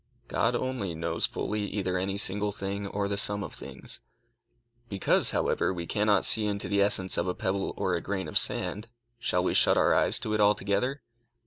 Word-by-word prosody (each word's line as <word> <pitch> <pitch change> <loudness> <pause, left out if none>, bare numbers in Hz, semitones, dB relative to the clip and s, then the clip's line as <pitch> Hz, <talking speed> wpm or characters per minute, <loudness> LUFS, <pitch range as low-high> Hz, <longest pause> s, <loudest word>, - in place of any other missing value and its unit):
God 120 +2 +1
only 120 -9 -2
knows 85 +1 0
fully 105 +1 -3
either 95 -3 -2
any 95 +2 -1
single 105 +1 +1
thing 100 0 -4
or 100 0 -2
the 100 0 -1
sum 100 0 +1
of - - -7
things. - - -8 0.9
Because, 100 -2 +3
however, - - +1
we 85 -2 -4
cannot 105 +1 +2
see 110 -1 +4
into 100 -1 -2
the 100 -1 +2
essence 95 -2 +1
of - - -1
a 90 - -1
pebble 95 +1 -2
or 95 - 0
a 85 - 0
grain 95 +1 -3
of - - -8
sand, 105 +3 0 0.3
shall 90 -6 0
we - - +1
shut - - +4
our - - +4
eyes - - +3
to 110 - -2
it 105 - +1
altogether? 105 +6 +1
100 Hz, 195 wpm, -28 LUFS, 95-105 Hz, 0.9 s, see